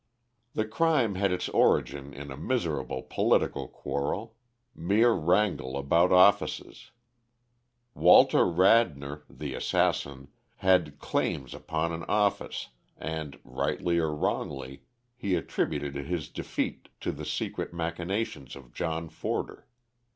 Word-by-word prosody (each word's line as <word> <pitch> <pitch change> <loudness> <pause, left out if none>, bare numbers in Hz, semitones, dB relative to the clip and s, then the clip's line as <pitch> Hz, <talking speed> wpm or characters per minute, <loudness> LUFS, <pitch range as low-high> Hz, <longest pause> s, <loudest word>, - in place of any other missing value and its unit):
The 110 - +1
crime 130 -2 +2
had 95 0 +1
its 90 - -1
origin 70 0 +2
in 70 +1 -8
a - - -6
miserable 80 - -2
political - - +1
quarrel 105 +11 -4 0.4
mere 105 +8 +3
wrangle 90 - +1
about 85 +6 +3
offices. 100 +3 +3 1.0
Walter - - +6
Radnor, 85 -6 +3
the - - -6
assassin, 70 -1 0 0.3
had 90 -8 +2
'claims' 65 -2 -2
upon 80 +1 -2
an 85 0 -4
office, 105 -1 0 0.3
and, 80 -3 -5
rightly 85 -1 -1
or 80 -2 0
wrongly, 70 -2 -3 0.3
he 100 -7 -1
attributed 70 -4 -2
his 75 +3 -4
defeat - - -4
to - - -1
the - - -8
secret - - -3
machinations 85 - -3
of 65 -3 -14
John 80 +1 -3
Forder. - - -4
85 Hz, 115 wpm, -28 LUFS, 70-100 Hz, 1.0 s, Walter